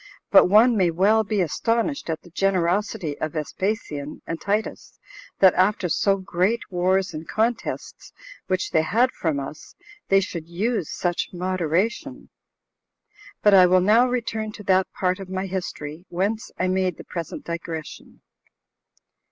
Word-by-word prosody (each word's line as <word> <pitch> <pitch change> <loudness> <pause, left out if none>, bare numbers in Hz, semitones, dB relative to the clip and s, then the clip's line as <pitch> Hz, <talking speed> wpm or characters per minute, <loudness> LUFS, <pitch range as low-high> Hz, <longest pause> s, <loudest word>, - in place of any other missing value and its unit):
But - - +7
one 225 +4 +6
may 185 -4 +3
well 200 +6 +3
be 210 -1 -1
astonished 230 - -1
at 160 -1 -3
the 175 - -16
generosity 185 -3 0
of 155 - -3
Vespasian 155 -2 -4
and 165 -1 -5
Titus, 210 +2 -3 0.4
that 190 -2 +6
after 185 0 +1
so 195 +4 +2
great 190 +4 0
wars 185 +1 +1
and 155 +1 -7
contests 225 +2 -3 0.4
which 185 -1 -1
they 160 - +3
had 230 +10 +2
from 155 -4 -2
us, 140 +3 -9 0.3
they 195 - +5
should 170 -4 -5
use 190 +1 -2
such 175 -1 -2
moderation. 185 - -2 1.1
But 210 - +6
I 185 -2 +8
will 185 +1 +4
now 215 +7 +4
return 225 -3 -2
to 210 - -10
that 190 -1 +2
part 185 0 -1
of 190 -1 -8
my 190 0 -3
history 175 -3 -5
whence 200 +5 -2
I 185 - 0
made 185 0 0
the - - -9
present 170 -2 -6
digression. 170 -2 -7
185 Hz, 145 wpm, -23 LUFS, 170-210 Hz, 1.1 s, I